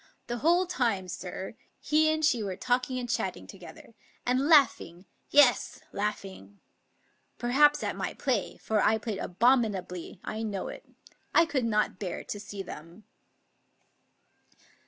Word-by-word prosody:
The 240 Hz, -, -4 dB
whole 345 Hz, +6 st, +3 dB
time, 230 Hz, -, -1 dB
sir, 185 Hz, +2 st, -6 dB, 0.3 s
he 310 Hz, +1 st, +3 dB
and 315 Hz, 0 st, +1 dB
she 245 Hz, -6 st, +2 dB
were 195 Hz, -3 st, -3 dB
talking 255 Hz, +4 st, -1 dB
and 245 Hz, -1 st, -3 dB
chatting -, -, -2 dB
together, -, -, -13 dB, 0.3 s
and 255 Hz, +3 st, +1 dB
laughing 230 Hz, -, +3 dB
— -, -, -44 dB
yes, 255 Hz, -4 st, +4 dB
laughing! 195 Hz, -, -5 dB, 0.8 s
Perhaps 290 Hz, +5 st, +3 dB
at -, -, -2 dB
my -, -, -4 dB
play, 245 Hz, -8 st, -1 dB
for 215 Hz, -1 st, 0 dB
I 220 Hz, -, +3 dB
played 220 Hz, -2 st, -4 dB
abominably; 195 Hz, -5 st, 0 dB
I 220 Hz, -, -4 dB
know 205 Hz, -4 st, -3 dB
it. -, -, -9 dB, 0.5 s
I 335 Hz, -, +7 dB
could 270 Hz, -7 st, -1 dB
not 215 Hz, -4 st, 0 dB
bear 185 Hz, -4 st, -4 dB
to 205 Hz, -, -6 dB
see 200 Hz, -1 st, -7 dB
them." 170 Hz, +4 st, -11 dB
225 Hz, 140 wpm, -28 LUFS, 195-265 Hz, 0.8 s, I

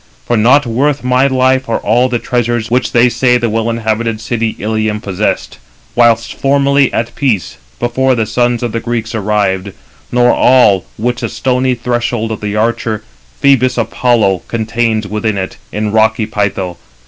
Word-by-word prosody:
For 120 Hz, -, 0 dB
not 125 Hz, +6 st, +4 dB
worth 135 Hz, +5 st, 0 dB
my 125 Hz, +2 st, +3 dB
life 130 Hz, -1 st, +1 dB
are 115 Hz, -, +1 dB
all 120 Hz, +4 st, +1 dB
the 125 Hz, -, 0 dB
[treasures] 120 Hz, -1 st, -2 dB
which 125 Hz, +1 st, +1 dB
they 120 Hz, +1 st, +4 dB
say 125 Hz, 0 st, +2 dB
the 120 Hz, -2 st, -1 dB
well 115 Hz, +1 st, -1 dB
inhabited 115 Hz, -1 st, -1 dB
city 115 Hz, 0 st, -2 dB
Ilium 110 Hz, 0 st, -1 dB
possessed, 100 Hz, -, -3 dB, 0.3 s
whilst 115 Hz, -1 st, +2 dB
formerly 140 Hz, 0 st, +2 dB
at 115 Hz, -, -2 dB
peace, 120 Hz, -, -1 dB, 0.2 s
before 130 Hz, +2 st, +1 dB
the 110 Hz, -2 st, 0 dB
sons 120 Hz, +2 st, 0 dB
of 120 Hz, -, -2 dB
the 115 Hz, -, -2 dB
Greeks 115 Hz, -1 st, -3 dB
arrived; 100 Hz, -3 st, -1 dB, 0.4 s
nor 125 Hz, 0 st, +4 dB
all 110 Hz, -8 st, +4 dB
which 120 Hz, +2 st, -2 dB
the -, -, -2 dB
stony 130 Hz, 0 st, 0 dB
threshold 120 Hz, -1 st, -2 dB
of 110 Hz, -, -5 dB
the 105 Hz, 0 st, -3 dB
archer 110 Hz, -1 st, -1 dB, 0.4 s
Phœbus 130 Hz, -3 st, +3 dB
Apollo 110 Hz, -4 st, +1 dB
contains 110 Hz, -1 st, -1 dB
within 105 Hz, 0 st, -2 dB
it, 95 Hz, -1 st, -4 dB
in 105 Hz, 0 st, -2 dB
rocky 110 Hz, 0 st, +2 dB
Pytho. 100 Hz, -4 st, -2 dB
115 Hz, 160 wpm, -13 LUFS, 110-125 Hz, 0.4 s, not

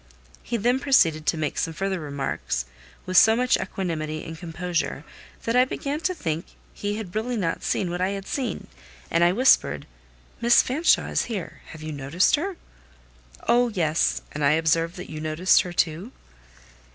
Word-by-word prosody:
He 235 Hz, -, -3 dB
then 245 Hz, +4 st, +2 dB
proceeded 165 Hz, -, +3 dB
to 165 Hz, -, +2 dB
make 150 Hz, -2 st, -2 dB
some 165 Hz, -, -2 dB
further 195 Hz, +1 st, -2 dB
remarks, 140 Hz, -, -3 dB, 0.4 s
with 185 Hz, 0 st, 0 dB
so 220 Hz, +3 st, +7 dB
much 250 Hz, +1 st, +3 dB
equanimity 155 Hz, -5 st, -3 dB
and 165 Hz, -, -7 dB
composure 170 Hz, +1 st, -3 dB, 0.4 s
that 230 Hz, -, -1 dB
I 250 Hz, -, +6 dB
began 280 Hz, +3 st, -3 dB
to 370 Hz, +3 st, -1 dB
think 165 Hz, -, -3 dB, 0.3 s
he 205 Hz, 0 st, -3 dB
had 210 Hz, -5 st, -6 dB
really 235 Hz, +3 st, -1 dB
not 170 Hz, -5 st, -1 dB
seen 180 Hz, -3 st, -1 dB
what 175 Hz, +1 st, -3 dB
I 185 Hz, -, +2 dB
had 195 Hz, -1 st, -5 dB
seen, 265 Hz, +2 st, -3 dB, 0.5 s
and 170 Hz, -, +3 dB
I 175 Hz, -, +5 dB
whispered—"Miss 70 Hz, -, +2 dB
Fanshawe 300 Hz, +7 st, +2 dB
is -, -, +1 dB
here: 205 Hz, -7 st, -6 dB
have 155 Hz, -1 st, -10 dB
you 155 Hz, -, -5 dB
noticed 145 Hz, +5 st, +1 dB
her?" 360 Hz, +4 st, -4 dB, 0.9 s
"Oh, 240 Hz, +1 st, +4 dB
yes! 170 Hz, -7 st, 0 dB
and 145 Hz, -, -4 dB
I 140 Hz, +1 st, +5 dB
observed 165 Hz, +2 st, +1 dB
that 180 Hz, -3 st, -8 dB
you 155 Hz, -1 st, -6 dB
noticed 155 Hz, +4 st, +3 dB
her 180 Hz, -, -6 dB
too." 175 Hz, +6 st, -1 dB
180 Hz, 170 wpm, -25 LUFS, 155-230 Hz, 0.9 s, so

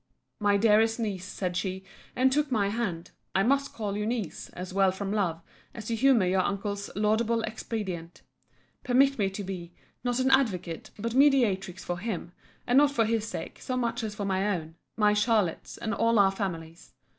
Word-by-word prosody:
My 205 Hz, -1 st, +3 dB
dearest 225 Hz, +2 st, +4 dB
niece, 200 Hz, -5 st, -3 dB
said 185 Hz, -2 st, -3 dB
she, 190 Hz, +1 st, -2 dB, 0.3 s
and 260 Hz, +1 st, +3 dB
took 295 Hz, 0 st, +1 dB
my 205 Hz, -4 st, +2 dB
hand, 195 Hz, -6 st, -3 dB, 0.2 s
(I 195 Hz, -, +4 dB
must 275 Hz, +4 st, +2 dB
call 205 Hz, -3 st, -4 dB
you 210 Hz, +1 st, -2 dB
niece, 225 Hz, -6 st, -3 dB
as 180 Hz, +1 st, -7 dB
well 195 Hz, -1 st, +4 dB
from 195 Hz, +1 st, -4 dB
love, 170 Hz, -6 st, -1 dB, 0.3 s
as 220 Hz, -4 st, -7 dB
to 230 Hz, -, -1 dB
humour 245 Hz, -4 st, +4 dB
your 185 Hz, +1 st, +2 dB
uncle's 200 Hz, +1 st, -3 dB
laudable 220 Hz, +2 st, +1 dB
expedient,) 195 Hz, -6 st, -5 dB, 0.6 s
permit 270 Hz, +1 st, +3 dB
me 195 Hz, -2 st, +2 dB
to 195 Hz, +1 st, -6 dB
be, 180 Hz, -3 st, -7 dB, 0.3 s
not 245 Hz, 0 st, 0 dB
an 260 Hz, +1 st, +2 dB
advocate, 185 Hz, -11 st, +1 dB
but 230 Hz, +2 st, -3 dB
a -, -, 0 dB
mediatrix 215 Hz, -11 st, +3 dB
for 175 Hz, 0 st, -3 dB
him; 185 Hz, -5 st, -4 dB, 0.3 s
and 245 Hz, +3 st, +5 dB
not 290 Hz, 0 st, +5 dB
for 235 Hz, -5 st, +1 dB
his 225 Hz, 0 st, 0 dB
sake, -, -, -6 dB
so 255 Hz, -, -2 dB
much 235 Hz, -1 st, -1 dB
as 210 Hz, -1 st, -4 dB
for 205 Hz, -2 st, -3 dB
my 195 Hz, +1 st, 0 dB
own, 165 Hz, -5 st, -3 dB, 0.2 s
my 210 Hz, -1 st, +4 dB
Charlotte's, 210 Hz, -5 st, 0 dB
and 225 Hz, -, -3 dB
all 230 Hz, 0 st, +2 dB
our 195 Hz, -1 st, +5 dB
family's. 170 Hz, -, -6 dB
210 Hz, 190 wpm, -28 LUFS, 190-230 Hz, 0.6 s, and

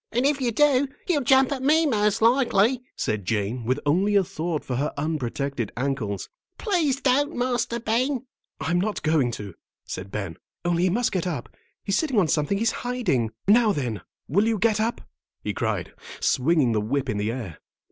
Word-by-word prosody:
"And 245 Hz, +3 st, +1 dB
if 285 Hz, -1 st, +2 dB
you 245 Hz, -2 st, +1 dB
do, 280 Hz, +1 st, +3 dB, 0.2 s
he'll 325 Hz, -6 st, +1 dB
jump 265 Hz, +1 st, +4 dB
at 270 Hz, -2 st, -2 dB
me, 310 Hz, +4 st, +4 dB
most 210 Hz, -5 st, +1 dB
likely," 235 Hz, -1 st, +3 dB
said 105 Hz, -1 st, -2 dB
Jane, 110 Hz, +4 st, -2 dB
with 130 Hz, +3 st, +1 dB
only 190 Hz, +8 st, +2 dB
a 200 Hz, -, +5 dB
thought 165 Hz, -2 st, -3 dB
for 125 Hz, -, -2 dB
her 145 Hz, +3 st, 0 dB
unprotected 140 Hz, -5 st, -2 dB
ankles. 125 Hz, -7 st, -2 dB, 0.3 s
"Please 330 Hz, -, +1 dB
don't, 280 Hz, +2 st, +2 dB
Master 245 Hz, -1 st, -1 dB
Ben." 245 Hz, +4 st, 0 dB, 0.3 s
"I'm 175 Hz, +2 st, 0 dB
not 210 Hz, +2 st, -2 dB
going 155 Hz, -5 st, +2 dB
to," 100 Hz, -4 st, -7 dB, 0.3 s
said 95 Hz, +1 st, -6 dB
Ben, 95 Hz, -5 st, -5 dB, 0.3 s
"only 175 Hz, 0 st, +1 dB
he -, -, +3 dB
must 235 Hz, +6 st, +1 dB
get 185 Hz, -1 st, -1 dB
up. 145 Hz, -9 st, -4 dB, 0.3 s
He's 195 Hz, -, +1 dB
sitting 285 Hz, -7 st, -1 dB
on 180 Hz, -6 st, +3 dB
something 150 Hz, +6 st, +1 dB
he's 225 Hz, +2 st, +2 dB
hiding. 220 Hz, -, 0 dB, 0.2 s
Now, 215 Hz, 0 st, +5 dB
then, 120 Hz, -, -3 dB, 0.3 s
will 200 Hz, +10 st, +2 dB
you 225 Hz, -1 st, +1 dB
get 215 Hz, +1 st, +2 dB
up?" 230 Hz, +3 st, -1 dB, 0.4 s
he -, -, -2 dB
cried, -, -, -2 dB, 0.3 s
swinging 140 Hz, -2 st, +2 dB
the 110 Hz, -1 st, +1 dB
whip 135 Hz, +5 st, -1 dB
in 105 Hz, -, -1 dB
the 105 Hz, +2 st, -1 dB
air. 115 Hz, -11 st, -6 dB
195 Hz, 185 wpm, -25 LUFS, -, 0.4 s, a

